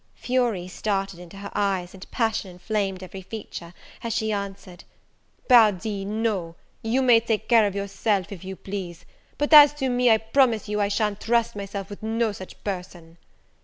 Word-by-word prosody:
Fury 240 -8 -1
started 195 -1 -3
into 180 +2 -12
her 200 0 -8
eyes, 190 -3 -1
and 190 -1 -12
passion 225 -4 -1
inflamed 190 +1 -3
every 190 +1 -8
feature, 185 -4 -8 0.3
as 230 -1 -2
she 220 0 -1
answered, 195 -3 -6 0.6
"Pardi, 210 -4 +4
no 205 -5 -2 0.3
you 240 +4 +1
may 240 -3 +6
take 225 -2 -2
care 225 -3 +5
of 200 - -5
yourself, 200 -1 -1
if 195 -3 -8
you 190 0 -6
please; 190 -3 -7 0.3
but 290 +2 0
as 295 -1 +10
to 265 -3 -1
me, 245 0 +3
I 220 - +6
promise 225 0 +2
you 210 0 -1
I 200 - +2
sha'n't 205 0 -1
trust 235 -1 +1
myself 200 0 -6
with 205 - -9
no 225 0 0
such 190 -2 -11
person." 180 -4 -6
205 Hz, 170 wpm, -24 LUFS, 190-225 Hz, 0.6 s, as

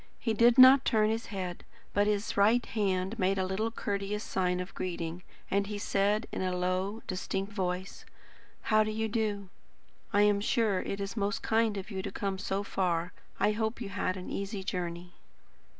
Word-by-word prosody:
He 225 - -1
did 235 +3 +5
not 260 +1 +9
turn 215 -1 +3
his 225 +1 -3
head, 185 -4 -5 0.3
but 205 0 +3
his 210 0 0
right 220 +4 +4
hand 195 0 -1
made 190 0 +2
a 190 - +1
little 195 +4 -1
courteous 205 -1 -3
sign 180 -1 0
of 180 +1 -6
greeting, 170 -1 -4 0.3
and 200 +1 +1
he 210 0 -4
said 205 +2 +1
in - - -3
a 185 -1 -1
low, 185 +4 -1
distinct 195 +2 -3
voice: 185 -1 -3 0.7
"How 215 0 +6
do 215 - -3
you 220 +1 -1
do? 210 -3 -2 0.6
I 205 -1 +4
am 205 -1 +3
sure 215 -3 +1
it 195 - -4
is 200 +1 -4
most 205 -2 -1
kind 225 -2 +2
of 195 +3 -6
you 190 -1 -3
to 200 0 -5
come 195 -1 -3
so 200 0 -2
far. 175 -3 -1 0.3
I 210 - +3
hope 220 +2 -2
you 220 -5 -5
had 185 -1 -2
an 185 - -7
easy 200 0 -4
journey." 175 -1 -4
200 Hz, 185 wpm, -30 LUFS, 185-215 Hz, 0.7 s, not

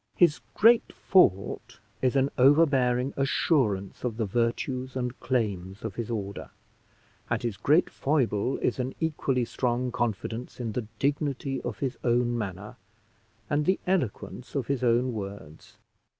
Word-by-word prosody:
His 170 -4 +4 0.2
great 230 +1 +5
fault 100 - +2 0.2
is 130 0 +1
an 135 0 +2
overbearing 135 -2 +4
assurance 130 - 0
of 120 -3 -2
the 115 - 0
virtues 120 +4 -1
and 125 -1 -3
claims 100 -6 -2
of 110 - -3
his 115 +2 -5
order, 100 -3 -4 0.8
and 115 +1 -1
his 115 -4 -2
great 150 - +3
foible 130 -5 0
is - - 0
an 130 +1 -2
equally 140 -6 0
strong 125 +1 -1
confidence 115 +1 -3
in 115 -3 -3
the 110 0 -4
dignity 140 -1 -1
of - - -5
his 130 -3 -3
own 120 0 +2
manner 100 -2 -5 0.7
and 150 0 0
the 190 - +3
eloquence 130 - -2
of 135 -4 0
his 135 0 -2
own 120 +1 +2
words. 100 -7 -8
125 Hz, 140 wpm, -27 LUFS, 110-135 Hz, 0.8 s, great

